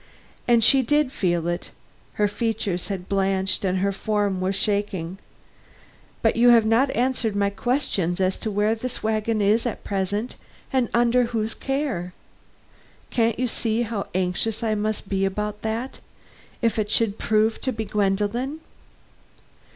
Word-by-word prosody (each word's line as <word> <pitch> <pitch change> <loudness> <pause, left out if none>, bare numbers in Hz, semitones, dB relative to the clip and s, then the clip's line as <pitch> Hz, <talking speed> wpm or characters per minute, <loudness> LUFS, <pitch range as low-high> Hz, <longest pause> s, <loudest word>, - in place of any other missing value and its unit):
And 235 -2 +5
she 270 +4 +6
did 295 +1 +2
feel 175 -7 0
it. 175 0 -3 0.4
Her 210 - +2
features 205 -4 -2
had 190 -2 -5
blanched 195 0 0
and 190 -1 +1
her 200 +2 +1
form 200 -1 -1
was 190 +1 0
shaking. 195 -3 -1 1.0
"But - - +3
you 240 +1 +5
have 230 -2 +6
not 230 +5 +3
answered 245 -4 0
my 200 0 +1
questions 200 - -1
as 185 0 +1
to 220 - -3
where 210 +1 +1
this 245 +2 -4
wagon 220 0 0
is 220 +4 +3
at 235 - -5
present 200 +4 -2 0.4
and 255 -3 +2
under 240 +1 +3
whose 225 -2 -2
care? 270 -11 -3 1.0
Can't 230 -2 +1
you 255 - 0
see 230 -1 0
how 215 -3 -3
anxious 185 +5 0
I 220 -1 +1
must 215 0 -2
be 195 -1 0
about 210 +2 -2
that 225 +4 -3 0.6
if 230 -1 +2
it 210 -1 -1
should 220 -2 +1
prove 220 +1 +1
to 260 - -1
be 220 -2 -4
Gwendolen?" 210 +8 -1
215 Hz, 150 wpm, -24 LUFS, 195-230 Hz, 1.0 s, she